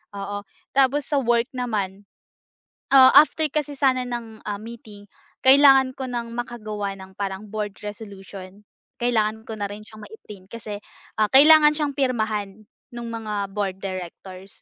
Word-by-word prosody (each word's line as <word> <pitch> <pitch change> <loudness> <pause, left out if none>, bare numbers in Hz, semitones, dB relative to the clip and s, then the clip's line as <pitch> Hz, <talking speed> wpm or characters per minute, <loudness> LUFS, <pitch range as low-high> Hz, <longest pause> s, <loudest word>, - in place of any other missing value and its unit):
oo. 205 +1 -5 0.3
Tapos 275 +2 +2
sa 285 -2 +1
work 235 -1 +1
naman, 205 -5 -4 0.9
ah, 260 -1 +9
after 310 0 +2
kasi 295 -1 -2
sana 260 -2 +1
ng, 230 -2 -7
ah, 205 - -2
meeting 220 -3 -11 0.4
kailangan 270 -1 +6
ko 265 -1 -5
ng 235 -1 -5
makagawa 215 -5 -5
ng 190 0 -13
parang 195 +1 -5
board 210 -2 -4
resolution, 200 -1 -10 0.4
kailangan 220 -2 0
ko 220 - -6
na 205 -1 -3
rin 210 +1 -9
siyang 215 0 -15
mai-print 210 - -13
kasi, 215 -3 -7 0.4
ah, 215 - +3
kailangan 300 +2 +7
siyang 295 -2 -1
pirmahan 215 -6 -2 0.3
nung 235 -1 -6
mga 210 -3 -4
board 195 -2 -3
directors, 185 +1 -8
220 Hz, 145 wpm, -23 LUFS, 205-255 Hz, 0.9 s, ah